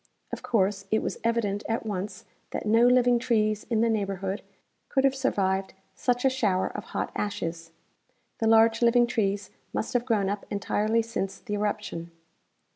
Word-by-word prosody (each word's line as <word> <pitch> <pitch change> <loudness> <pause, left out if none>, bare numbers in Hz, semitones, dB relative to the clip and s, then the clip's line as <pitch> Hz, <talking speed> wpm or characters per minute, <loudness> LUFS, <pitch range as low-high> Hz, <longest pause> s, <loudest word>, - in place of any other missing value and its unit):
Of - - -4
course, 200 -3 +1
it 220 - +2
Avas - - -3
evident 225 -3 0
at 225 0 -1
once 195 -2 -4 0.2
that - - -4
no 225 +3 +5
living 245 -1 +4
trees 215 -4 +1
in 225 -2 +2
the 230 - +3
neighborhood 195 -2 -2 0.5
could 270 - +2
have 270 -1 +4
surAaved 195 -8 0 0.2
such 245 0 0
a - - +6
shower 205 -8 +1
of - - -5
hot - - -3
'' - - -29
ashes." 170 -5 -3 0.7
The 225 - +1
large 225 +1 +5
living 240 0 +5
trees 205 -5 -1 0.2
must - - -2
have 245 -1 +1
groAvn 215 -6 +1
up 205 0 -5
entirely 210 +3 +1
since 195 -4 -3
the 210 - -7
eruption. 205 -5 -2
215 Hz, 170 wpm, -27 LUFS, 195-235 Hz, 0.7 s, a